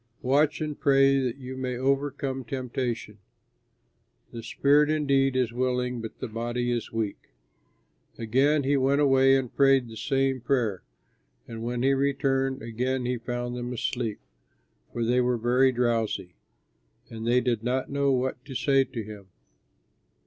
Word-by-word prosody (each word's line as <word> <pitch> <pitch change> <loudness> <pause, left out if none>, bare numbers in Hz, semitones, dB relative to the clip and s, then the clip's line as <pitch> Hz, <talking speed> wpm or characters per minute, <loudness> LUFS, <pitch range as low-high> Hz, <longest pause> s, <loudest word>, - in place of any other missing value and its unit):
Watch 145 +4 +2
and 150 -1 -4
pray 135 -1 +4
that 130 -1 -2
you 130 -1 -8
may 130 -1 -3
overcome 135 0 -1
temptation. 120 -4 -4 1.1
The 115 - -7
spirit 145 +5 +3
indeed 140 -3 +2
is 125 -3 0
willing, 125 -1 -1
but 115 - -8
the - - -5
body 120 +2 -2
is 120 -1 -3
weak." 110 - -4 0.8
Again 135 +6 +2
he 140 +1 +2
went 135 +2 +2
away 135 -2 +5
and 130 -3 -4
prayed 135 -3 +4
the 110 - -10
same 135 +2 0
prayer. 120 -6 0 0.7
And 115 -1 -7
when 120 +1 -2
he 135 +1 +4
returned, 135 -1 0
again 125 +3 -2
he 125 -1 -1
found 120 +1 -4
them 120 0 -4
asleep, 115 -2 -3 0.7
for 120 - -2
they 125 +2 +2
were 125 0 +1
very 125 +3 +3
drowsy; 115 -7 -1 0.8
and 115 0 -6
they 120 +1 +4
did 120 -3 -1
not 130 +3 -1
know 140 0 +1
what 130 -1 -1
to 135 -2 -9
say 135 0 +3
to 120 -3 -6
him. 105 -2 -11
125 Hz, 150 wpm, -26 LUFS, 120-135 Hz, 1.1 s, away